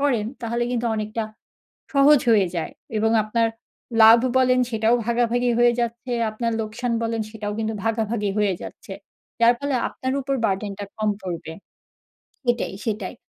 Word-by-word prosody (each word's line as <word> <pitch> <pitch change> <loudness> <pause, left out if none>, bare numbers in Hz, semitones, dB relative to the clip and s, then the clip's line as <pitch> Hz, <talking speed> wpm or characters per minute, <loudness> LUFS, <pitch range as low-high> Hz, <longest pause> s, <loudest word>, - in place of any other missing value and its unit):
করেন, 250 -7 +1 0.2
তাহলে 235 +1 -1
কিন্তু 240 -1 -1
অনেকটা 215 +1 -3 0.7
সহজ 280 0 +6
হয়ে 205 -4 +5
যায়। 165 - -3 0.3
এবং 220 +1 +2
আপনার 225 +2 +1 0.5
লাভ 225 +1 +9 0.2
বলেন, 255 -1 +4
সেটাও 225 0 +2
ভাগাভাগি 240 +1 +1
হয়ে 240 0 +5
যাচ্ছে, 235 +1 -3 0.2
আপনার 230 +2 -2
লোকসান 225 +3 -3
বলেন, 230 0 -1
সেটাও 210 -2 -5
কিন্তু 220 0 -2
ভাগাভাগি 225 -2 0
হয়ে 205 -3 +2
যাচ্ছে। - - -9 0.5
যার 235 +1 +6
ফলে 285 -1 -1
আপনার 260 0 -4
উপর 275 +1 -2
burden 200 0 0
টা - - -3
কম 215 -1 +1
পড়বে 170 -3 -5 0.9
সেটাই, 240 -4 0
সেটাই। 210 -3 -3
230 Hz, 150 wpm, -23 LUFS, 215-245 Hz, 0.9 s, লাভ